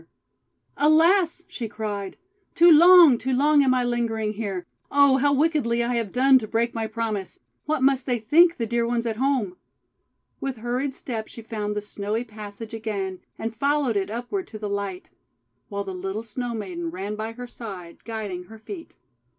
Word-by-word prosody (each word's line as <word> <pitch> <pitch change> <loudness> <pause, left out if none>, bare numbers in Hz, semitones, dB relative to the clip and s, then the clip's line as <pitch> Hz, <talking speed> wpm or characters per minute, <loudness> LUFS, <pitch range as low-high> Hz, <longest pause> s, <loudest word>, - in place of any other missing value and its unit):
THE - - -26 0.7
PROMISE 305 +1 +6
BROKEN - - +6 0.2
"ALAS!' 350 -1 -2
she 235 - -5
cried, 205 -3 -5 0.4
'too 345 +1 +7
long, 335 -5 +8
too 260 0 -2
long 290 +3 +4
am 255 -1 +3
I 250 - +1
lingering 230 -3 -1
here! 200 -4 -4 0.2
Oh, 280 -2 +5
how 285 +2 +2
wickedly 280 -5 +1
I 240 +1 -1
have 230 -5 -1
done 265 +1 +5
to 220 - -6
break 230 +2 0
my 225 -1 -2
promise! 215 -3 -4 0.3
What 305 -3 0
must 270 -1 +2
they 245 -2 +1
think, 330 +10 +4
the 230 - -1
dear 235 +1 0
ones 235 0 -1
at 225 -2 -2
home?' 250 -8 0 0.8
With 270 -2 -4
hurried 250 +4 -2
step 225 -6 -5
she 230 - -11
found 210 -2 -4
the 210 - -3
snowy 210 +2 -3
passage 215 -1 -9
again, 200 -4 -4 0.2
and 225 0 -4
followed 280 -1 +1
it 195 -1 0
upward 245 - -4
to 215 - -9
the 210 -1 -5
light; 200 -2 -4 0.6
while 200 0 -3
the 190 -1 -6
little 195 +4 -4
Snow 235 +1 -4
Maiden 180 -6 -4
ran 195 +5 -5
by 220 +1 -5
her 245 +1 -8
side, 195 -8 -9
guiding 210 -5 -5
her 220 +4 -12
feet. 330 - -10
230 Hz, 190 wpm, -24 LUFS, 210-265 Hz, 0.8 s, long